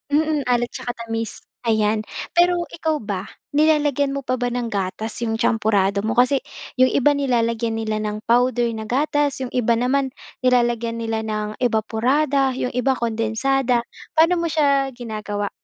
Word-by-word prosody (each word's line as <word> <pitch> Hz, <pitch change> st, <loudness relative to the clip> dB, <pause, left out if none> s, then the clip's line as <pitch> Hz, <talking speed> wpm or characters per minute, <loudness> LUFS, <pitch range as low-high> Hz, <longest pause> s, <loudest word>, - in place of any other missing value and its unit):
mm, 310 Hz, -1 st, +2 dB
alat 240 Hz, -1 st, +1 dB
tsaka 245 Hz, -, -5 dB
tamis. 225 Hz, -1 st, -4 dB, 0.2 s
Ayan, 215 Hz, -1 st, +1 dB, 0.2 s
pero 350 Hz, +1 st, +4 dB, 0.2 s
ikaw 315 Hz, -5 st, -2 dB
ba, 200 Hz, -1 st, -4 dB, 0.2 s
nilalagyan 290 Hz, -2 st, +2 dB
mo 275 Hz, -, -3 dB
pa 255 Hz, 0 st, -1 dB
ba 245 Hz, -, 0 dB
ng 245 Hz, -1 st, -3 dB
gatas 200 Hz, +3 st, -3 dB
'yong 225 Hz, -2 st, -1 dB
champorado 205 Hz, -3 st, +2 dB
mo? 220 Hz, +3 st, -1 dB
Kasi 255 Hz, +2 st, +4 dB, 0.4 s
'yong 255 Hz, -, +7 dB
iba 275 Hz, +2 st, +3 dB
nilalagyan 235 Hz, -5 st, 0 dB
nila 215 Hz, -1 st, -2 dB
ng 215 Hz, 0 st, -4 dB
powder 245 Hz, +1 st, +3 dB
na 220 Hz, -1 st, -6 dB
gatas, 285 Hz, +2 st, 0 dB
'yong 250 Hz, -, -5 dB
iba 235 Hz, -2 st, +2 dB
naman 260 Hz, +3 st, +1 dB, 0.3 s
nilalagyan 240 Hz, -2 st, +2 dB
nila 225 Hz, -1 st, -1 dB
ng 215 Hz, -1 st, -4 dB
ebaporada, 255 Hz, +4 st, +1 dB
'yong 250 Hz, -, -2 dB
iba, 250 Hz, +2 st, +1 dB
kondensada. 235 Hz, +2 st, 0 dB, 0.3 s
Paano 335 Hz, +2 st, +4 dB
mo 335 Hz, -, 0 dB
siya 280 Hz, -4 st, +2 dB
ginagawa? 215 Hz, -4 st, -4 dB
240 Hz, 155 wpm, -22 LUFS, 220-275 Hz, 0.4 s, yong